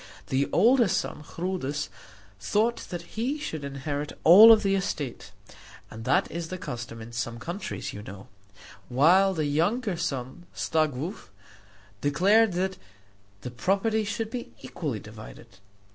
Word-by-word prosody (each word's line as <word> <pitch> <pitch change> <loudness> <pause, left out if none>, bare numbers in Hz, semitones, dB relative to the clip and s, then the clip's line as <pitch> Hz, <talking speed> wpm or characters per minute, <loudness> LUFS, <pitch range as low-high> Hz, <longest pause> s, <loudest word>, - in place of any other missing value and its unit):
The 135 +1 +1
older 240 0 +5
son 170 - -2
Chrudis 150 -3 -3 0.5
thought 215 - +1
that 175 -2 -5
he 235 - -3
should 160 - -5
inherit 140 +1 -4
all 205 +7 +10
of 220 -1 +6
the 195 -1 +2
estate 155 -9 -3 0.6
and 110 +1 -9
that 140 +3 +2
is 170 +1 -4
the 185 - -5
custom 120 -8 -7
in 115 - -11
some 115 0 -3
countries, 175 - -5
you 105 - -7
know 95 -1 -10 0.6
while 180 +9 +4
the 155 -2 0
younger 180 - 0
son, 140 0 -4
Staglow, 155 - -1 0.7
declared 195 - +3
that 185 +1 -1 0.6
the 125 - -6
property 200 - 0
should 220 +1 -3
be 245 -2 -5
equally 140 -10 -4
divided. 110 -2 -12
165 Hz, 135 wpm, -27 LUFS, 135-200 Hz, 0.7 s, all